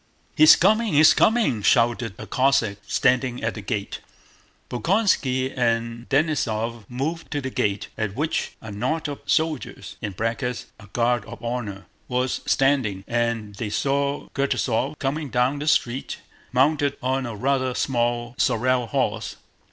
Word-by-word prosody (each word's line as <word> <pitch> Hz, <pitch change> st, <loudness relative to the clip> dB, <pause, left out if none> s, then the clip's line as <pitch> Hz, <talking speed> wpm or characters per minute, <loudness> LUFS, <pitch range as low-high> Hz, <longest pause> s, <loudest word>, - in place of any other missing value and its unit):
"He's 155 Hz, 0 st, +9 dB
coming! 215 Hz, +2 st, +2 dB
He's 155 Hz, +2 st, +7 dB
coming!" 220 Hz, -, +2 dB
shouted 115 Hz, -2 st, +2 dB
a -, -, -8 dB
Cossack 115 Hz, -6 st, +1 dB
standing 125 Hz, -1 st, +1 dB
at 110 Hz, -, 0 dB
the 110 Hz, -, -7 dB
gate. 100 Hz, -1 st, -4 dB, 0.7 s
Bolkónski 130 Hz, -, +1 dB
and 115 Hz, -1 st, -1 dB
Denísov 120 Hz, -7 st, 0 dB
moved 150 Hz, +7 st, -3 dB
to 145 Hz, -, -2 dB
the 130 Hz, -1 st, -4 dB
gate, 100 Hz, -3 st, -1 dB
at 105 Hz, -2 st, -2 dB
which 155 Hz, +5 st, -1 dB
a 110 Hz, -, -8 dB
knot 130 Hz, +11 st, -2 dB
of 145 Hz, -1 st, -5 dB
soldiers 155 Hz, -3 st, -1 dB
(a 105 Hz, -, -2 dB, 0.8 s
guard 120 Hz, 0 st, +1 dB
of -, -, -11 dB
honor) 115 Hz, -5 st, -4 dB, 0.2 s
was 125 Hz, 0 st, -1 dB
standing, 130 Hz, -9 st, +2 dB
and 115 Hz, -3 st, -1 dB
they 110 Hz, -1 st, -3 dB
saw 140 Hz, +5 st, -1 dB
Kutúzov 135 Hz, 0 st, 0 dB
coming 145 Hz, +1 st, -2 dB
down 125 Hz, +3 st, +1 dB
the 150 Hz, -, -4 dB
street 130 Hz, -3 st, 0 dB, 0.3 s
mounted 140 Hz, +2 st, +2 dB
on 130 Hz, 0 st, 0 dB
a 115 Hz, -, -6 dB
rather 130 Hz, +2 st, 0 dB
small 120 Hz, -2 st, -1 dB
sorrel 125 Hz, 0 st, +2 dB
horse. 115 Hz, -6 st, -1 dB
125 Hz, 135 wpm, -24 LUFS, 115-140 Hz, 0.8 s, He's